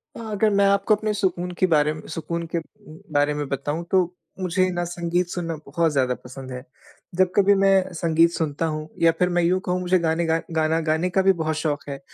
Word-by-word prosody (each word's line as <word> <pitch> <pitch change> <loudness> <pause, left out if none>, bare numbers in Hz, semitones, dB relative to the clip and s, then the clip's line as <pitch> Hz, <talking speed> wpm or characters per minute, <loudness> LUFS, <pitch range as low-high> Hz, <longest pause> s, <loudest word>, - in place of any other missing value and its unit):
अ - - -8
अगर 215 +1 +2
मैं 200 -1 +3
आपको 200 +2 +3
अपने 215 0 -2
सुकून 185 -3 -1
के - - +4
बारे 150 -2 +3
में 155 - -9
सुकून 170 +1 -4
के - - +1
उ 155 -1 -15 0.2
बारे 145 +1 +2
में 145 -1 -3
बताऊँ 145 +4 -3
तो 190 - +5 0.4
मुझे 185 0 +1
न 175 - 0
संगीत 175 +1 -1
सुनना 170 -2 -3
बहुत 160 +3 0
ज़्यादा 130 -3 +1
पसंद 130 +1 -9
है। 125 0 -6 0.5
जब 185 0 +3
कभी 200 0 +5
मैं 195 -1 +3
संगीत 165 0 +3
सुनता 160 -1 -2
हूँ 155 -1 -3
या 165 0 +6
फिर 180 - +3
मैं 175 -1 +1
यूँ 180 +2 +2
कहूँ 180 0 0
मुझे 180 0 +2
गाने 165 0 0
गा 165 0 +1 0.2
गाना 160 +1 +2
गाने 160 +4 +1
का 190 +1 +2
भी 195 0 +4
बहुत 155 0 -1
शौक 155 -2 -2
है 140 -1 -5
170 Hz, 220 wpm, -23 LUFS, 155-185 Hz, 0.5 s, या